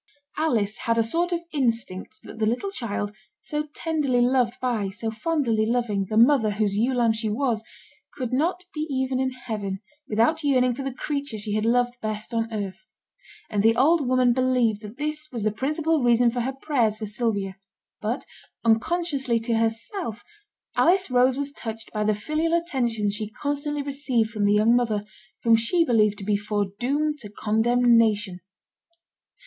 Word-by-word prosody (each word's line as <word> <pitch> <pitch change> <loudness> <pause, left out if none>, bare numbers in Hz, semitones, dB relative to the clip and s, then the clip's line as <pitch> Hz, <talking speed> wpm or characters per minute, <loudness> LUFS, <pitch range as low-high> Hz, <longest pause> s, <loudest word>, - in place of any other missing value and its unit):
Alice 220 -10 +1
had 230 - +3
a 230 - +4
sort 340 +10 0
of 345 -1 0
instinct 235 - -2
that - - -11
the 215 - +2
little 250 - -1
child, 210 - -3 0.3
so 300 0 -3
tenderly 300 -6 0
loved 245 -1 +2
by, 230 -6 -1
so 220 +3 -4
fondly 230 -2 0
loving, 220 -4 0
the 215 - 0
mother 235 -1 +5
whose 205 -1 0
ewe 240 +5 +1
lamb 235 -2 +3
she 220 0 -2
was, 225 -1 0 0.5
could 255 -2 -4
not 350 +7 0
be 305 - -6
even 260 -1 0
in 260 0 +1
heaven 215 -6 -5 0.3
without 235 +9 +2
yearning 255 -3 +3
for 265 - -6
the 270 0 -3
creature 280 -2 -3
she 210 0 -3
had 215 +1 0
loved 245 +1 +2
best 215 +1 -4
on 225 0 -1
earth; 205 -1 -5 0.6
and 205 -2 0
the 225 +2 +4
old 285 +3 +3
woman 255 -1 +4
believed 250 -4 +2
that 210 +2 -10
this 305 +1 -3
was 235 -4 -4
the 215 - +2
principal 300 +7 0
reason 240 0 +4
for 245 - -3
her 265 +3 -2
prayers 235 -8 +1
for 215 - -4
Sylvia; 205 -3 -2 0.4
but - - -2 0.4
unconsciously 265 +1 +1
to 230 +1 -1
herself, 225 - -2 0.5
Alice 365 -2 +3
Rose 250 +1 +4
was 285 0 -2
touched 225 -4 -7
by 210 -1 0
the 215 0 +2
filial 310 +10 -1
attentions 240 -11 -1
she 210 0 -3
constantly 290 +4 -3
received 270 -5 0
from 210 -3 0
the 205 - +4
young 215 +3 +4
mother, 220 -4 0 0.4
whom 230 -1 +6
she 280 +10 +2
believed 215 -5 +3
to 195 - -8
be 210 0 +2
foredoomed 215 +9 -1
to 210 - -8
condemnation. 220 -2 +2
235 Hz, 170 wpm, -25 LUFS, 215-275 Hz, 0.6 s, whom